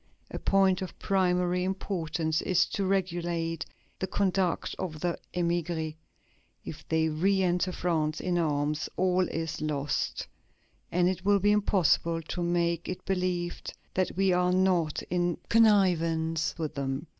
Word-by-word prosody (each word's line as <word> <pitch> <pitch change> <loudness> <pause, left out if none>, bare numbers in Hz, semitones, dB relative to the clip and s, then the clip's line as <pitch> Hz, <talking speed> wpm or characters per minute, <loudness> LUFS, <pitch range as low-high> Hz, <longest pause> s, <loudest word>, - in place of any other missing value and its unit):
A - - -4
point 195 -1 +3
of 185 - -6
primary 180 -2 +1
importance 165 -4 -1
is 185 -1 +3
to 195 -2 -1
regulate 170 -4 -1 0.3
the 190 - -2
conduct 190 -2 0
of 160 -5 -4
the 175 -1 0 0.2
émigrés. 170 -2 -1 0.7
If 155 - -8
they 160 0 +2
re 190 +5 +1
enter 180 +1 +1
France 160 -4 -1
in 180 -1 0
arms, 150 -1 0
all 185 0 +2
is 165 -1 -4
lost, 145 -2 -2 0.7
and 175 0 +3
it 185 0 -2
will 200 +1 +4
be 205 +2 +3
impossible 170 -5 +2
to 175 - -4
make 170 -1 0
it 185 - -6
believed 180 -2 -2 0.2
that 185 -1 -1
we 195 -1 +3
are 180 0 +2
not 180 -4 +1
in 175 -1 -1
connivance 165 -7 +3
with 155 -2 -3
them. 135 0 -3
175 Hz, 140 wpm, -28 LUFS, 165-185 Hz, 0.7 s, will